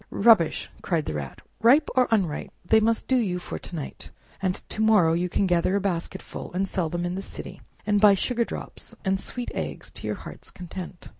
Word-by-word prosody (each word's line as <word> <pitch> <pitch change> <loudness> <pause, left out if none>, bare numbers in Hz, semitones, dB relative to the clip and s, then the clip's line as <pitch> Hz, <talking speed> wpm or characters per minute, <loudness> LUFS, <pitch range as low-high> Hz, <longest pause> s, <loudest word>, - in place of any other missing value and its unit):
"Rubbish!" 205 -6 +4
cried 165 -4 0
the - - -3
Rat; 70 -3 -6 0.2
"ripe 270 +7 +6
or 255 -1 +4
unripe, 190 -9 0 0.2
they 220 +5 +5
must 225 +1 +1
do 260 - +3
you 195 -7 0
for 180 - -6
to 175 - -8
night, 150 -4 -6 0.3
and 185 -1 +1
to 215 - -2
morrow 210 -7 +5
you 175 +2 0
can 195 - +1
gather 180 +1 +2
a - - +3
basketful, 180 -4 -4
sell 185 -4 -1
them 175 +2 -2
in 175 - -2
the 190 - -3
city, - - -7 0.2
and 205 -1 +2
buy 205 -2 +8
sugar 235 +4 0
drops - - -8
and 190 0 +1
sweet 245 +4 -3
eggs - - -5
to - - -6
your - - -1
heart's - - -10
content!" 180 0 -8
190 Hz, 205 wpm, -26 LUFS, 175-220 Hz, 0.3 s, buy